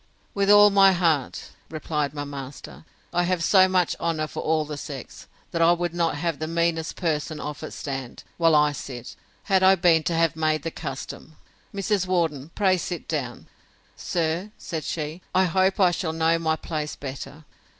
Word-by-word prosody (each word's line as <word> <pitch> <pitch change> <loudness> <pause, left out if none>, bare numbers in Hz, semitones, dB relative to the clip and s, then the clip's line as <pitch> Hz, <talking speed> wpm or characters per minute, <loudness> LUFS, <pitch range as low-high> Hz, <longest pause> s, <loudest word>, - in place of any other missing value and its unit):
With 200 0 +1
all 205 0 +8
my 195 -1 +6
heart, 165 -7 0 0.2
replied 150 -2 -2
my 145 0 -5
master; 140 +1 -9 0.3
I 175 - +2
have 180 -1 0
so 190 +1 +6
much 185 -2 +1
honour 165 -2 -1
for - - -7
all 155 -1 +1
the 150 0 -6
sex, 140 -2 -8 0.2
that 165 - -1
I 165 +1 +6
would 175 -1 -2
not 170 -3 0
have 165 +1 -2
the 155 - -3
meanest 165 -1 -1
person 155 -2 -2
of 150 -1 -6
it 155 - -5
stand, 135 -3 -6
while 165 -2 +4
I 150 0 +4
sit, 125 -8 -8 0.3
had 190 -3 +2
I 190 0 +6
been 170 -3 +4
to 170 - 0
have 165 -2 +2
made 155 -2 0
the 165 - -3
custom. 155 +1 -7 0.4
Mrs. 195 -1 -1
Worden, 160 -6 0
pray 190 -3 +3
sit 175 -1 -5
down. 130 -6 -4 0.5
Sir, 170 +3 -2
said 160 -3 -5
she, 155 +2 -4
I 185 - +5
hope 190 +3 +1
I 185 -2 +5
shall 165 -2 -2
know 165 +1 +2
my 160 -1 +1
place 155 -1 -4
better. 140 +3 -8
165 Hz, 180 wpm, -24 LUFS, 150-175 Hz, 0.5 s, all